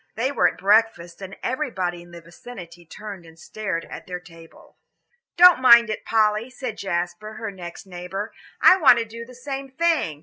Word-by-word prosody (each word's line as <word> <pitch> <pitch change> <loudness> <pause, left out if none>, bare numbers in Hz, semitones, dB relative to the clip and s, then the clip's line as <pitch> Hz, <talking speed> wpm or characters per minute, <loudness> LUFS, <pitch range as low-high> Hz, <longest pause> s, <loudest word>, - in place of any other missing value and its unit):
They 255 +5 -1
were - - +3
at - - -4
breakfast, 200 -4 +1
and 195 0 -8
everybody 195 - -3
in 175 - -16
the 170 0 -12
vicinity 175 -1 -12
turned 200 0 -9
and 165 -1 -17
stared 185 -2 -5
at - - -10
their 180 -1 -5
table. 165 -1 -18 0.6
"Don't 355 -5 +7
mind 235 -3 +7
it, 215 - -6
Polly," 215 +1 +1
said 255 -3 -7
Jasper, 175 +3 -4
her 220 -1 -6
next 175 -2 -10
neighbour, 190 +3 -7 0.3
"I 370 - +7
want 290 -8 +6
to 230 - -1
do 230 +1 -10
the 250 - -14
same 270 +1 -6
thing. 295 - 0
210 Hz, 180 wpm, -23 LUFS, 175-240 Hz, 0.6 s, Don't